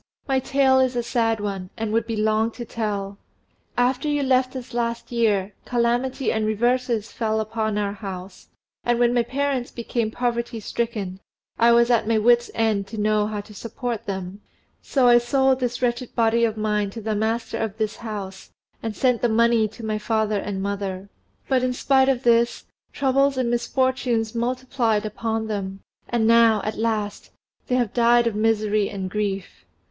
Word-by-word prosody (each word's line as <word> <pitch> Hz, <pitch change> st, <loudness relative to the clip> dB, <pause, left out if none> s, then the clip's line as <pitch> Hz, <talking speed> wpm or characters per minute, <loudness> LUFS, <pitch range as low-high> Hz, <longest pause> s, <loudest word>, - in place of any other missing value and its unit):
my 270 Hz, -1 st, +2 dB
tale 265 Hz, 0 st, +3 dB
is 260 Hz, -1 st, +2 dB
a 240 Hz, -, 0 dB
sad 230 Hz, -2 st, 0 dB
one, 195 Hz, -3 st, -4 dB
and 220 Hz, -1 st, -2 dB
would 230 Hz, 0 st, +1 dB
be 225 Hz, -, -2 dB
long 215 Hz, +1 st, +2 dB
to 240 Hz, +1 st, -8 dB
tell. 205 Hz, -3 st, -3 dB, 0.6 s
After 250 Hz, +4 st, +1 dB
you 290 Hz, -1 st, +1 dB
left 255 Hz, 0 st, +2 dB
us 250 Hz, -1 st, -7 dB
last 235 Hz, 0 st, -2 dB
year, 210 Hz, -4 st, +1 dB
calamity 245 Hz, +3 st, 0 dB
and 220 Hz, -, 0 dB
reverses 235 Hz, +1 st, 0 dB
fell 220 Hz, -1 st, -1 dB
upon 220 Hz, -1 st, -2 dB
our 200 Hz, -1 st, -1 dB
house; 190 Hz, -2 st, -8 dB, 0.4 s
and 240 Hz, -1 st, +1 dB
when 240 Hz, 0 st, +3 dB
my 245 Hz, -, +3 dB
parents 265 Hz, +1 st, -1 dB
became 235 Hz, -1 st, -2 dB
poverty 235 Hz, 0 st, -2 dB
stricken, 210 Hz, -4 st, -3 dB, 0.4 s
I 235 Hz, +1 st, +6 dB
was 235 Hz, +1 st, +5 dB
at 225 Hz, -2 st, +2 dB
my 225 Hz, -1 st, +3 dB
wits' 240 Hz, +2 st, +4 dB
end 215 Hz, -3 st, +1 dB
to 220 Hz, -, -8 dB
know 210 Hz, 0 st, +2 dB
how 210 Hz, -1 st, -3 dB
to 210 Hz, +1 st, -15 dB
support 230 Hz, +2 st, -5 dB
them: 190 Hz, 0 st, -5 dB, 0.4 s
so 260 Hz, -3 st, +2 dB
I 240 Hz, 0 st, +7 dB
sold 265 Hz, +2 st, +2 dB
this 245 Hz, 0 st, -2 dB
wretched 240 Hz, 0 st, -1 dB
body 230 Hz, 0 st, +3 dB
of 220 Hz, -1 st, -2 dB
mine 210 Hz, -1 st, 0 dB
to 225 Hz, -, -8 dB
the 220 Hz, 0 st, -2 dB
master 220 Hz, +2 st, -1 dB
of 220 Hz, -2 st, -3 dB
this 220 Hz, 0 st, -2 dB
house, 205 Hz, -4 st, -7 dB, 0.3 s
and 225 Hz, -2 st, -4 dB
sent 250 Hz, -3 st, +2 dB
the 240 Hz, -, +2 dB
money 230 Hz, 0 st, +3 dB
to 220 Hz, +2 st, -10 dB
my 215 Hz, -1 st, -1 dB
father 215 Hz, -1 st, 0 dB
and 195 Hz, -1 st, -4 dB
mother; 200 Hz, -1 st, -4 dB, 0.4 s
but, 260 Hz, -2 st, +2 dB
in 255 Hz, 0 st, 0 dB
spite 265 Hz, +1 st, +3 dB
of 260 Hz, -1 st, 0 dB
this, 235 Hz, 0 st, +2 dB, 0.3 s
troubles 275 Hz, 0 st, +2 dB
and 245 Hz, -2 st, 0 dB
misfortunes 240 Hz, -2 st, 0 dB
multiplied 235 Hz, -2 st, 0 dB
upon 220 Hz, +1 st, -2 dB
them, 195 Hz, -2 st, -4 dB, 0.3 s
and 235 Hz, -2 st, +1 dB
now, 230 Hz, -1 st, +5 dB
at 215 Hz, -, -3 dB
last, 215 Hz, -2 st, -2 dB, 0.4 s
they 250 Hz, -, +1 dB
have 245 Hz, -4 st, 0 dB
died 240 Hz, 0 st, +4 dB
of 230 Hz, -, +1 dB
misery 215 Hz, -1 st, +1 dB
and 190 Hz, -2 st, -5 dB
grief. 195 Hz, -, -3 dB
230 Hz, 180 wpm, -23 LUFS, 210-245 Hz, 0.6 s, I